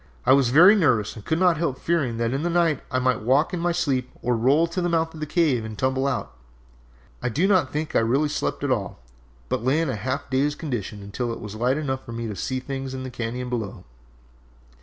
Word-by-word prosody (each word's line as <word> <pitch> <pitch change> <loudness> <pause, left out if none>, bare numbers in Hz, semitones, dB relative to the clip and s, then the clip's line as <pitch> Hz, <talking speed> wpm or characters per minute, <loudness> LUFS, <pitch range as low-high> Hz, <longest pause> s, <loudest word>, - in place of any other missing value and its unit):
I - - +6
was 135 -3 +4
very 175 - +8
nervous 125 - +2
and 110 - -10
could 160 - 0
not 180 -2 +3
help 150 -5 -1
fearing 140 -9 0
that 115 +1 0
in 135 - -1
the 175 - 0
night 170 -4 +2
I 130 - -1
might 130 -2 +1
walk 135 - +2
in 180 - -1
my 175 +1 +1
sleep 135 -7 0
or 125 0 +1
roll 135 +8 +3
to 170 +2 -3
the 175 - 0
mouth 165 -1 0
of 160 - -10
the 155 - -4
cave 150 -8 +2
and 110 -1 -7
tumble 130 +3 0
out. 135 - -3 0.9
I 125 - -1
do 155 - +1
not 185 -9 +3
think 150 +1 -3
I - - +6
really 130 +7 +2
slept 150 - -2
at - - 0
all, - - -1 0.5
but 105 - -2
lay 135 +5 +2
in 165 -4 0
a - - -3
half 130 +7 -3
dazed 145 +3 +1
condition 105 -8 -4
until 115 +4 -3
it 115 - -5
was 105 -1 -7
light 125 +5 0
enough 130 -3 -3
for 115 - -9
me 115 0 -4
to 105 - -5
see 130 +7 -2
things 135 0 -5
in 130 - -5
the 130 - -6
cañon 120 +1 -4
below. 110 -5 -4
130 Hz, 245 wpm, -24 LUFS, 120-160 Hz, 0.9 s, very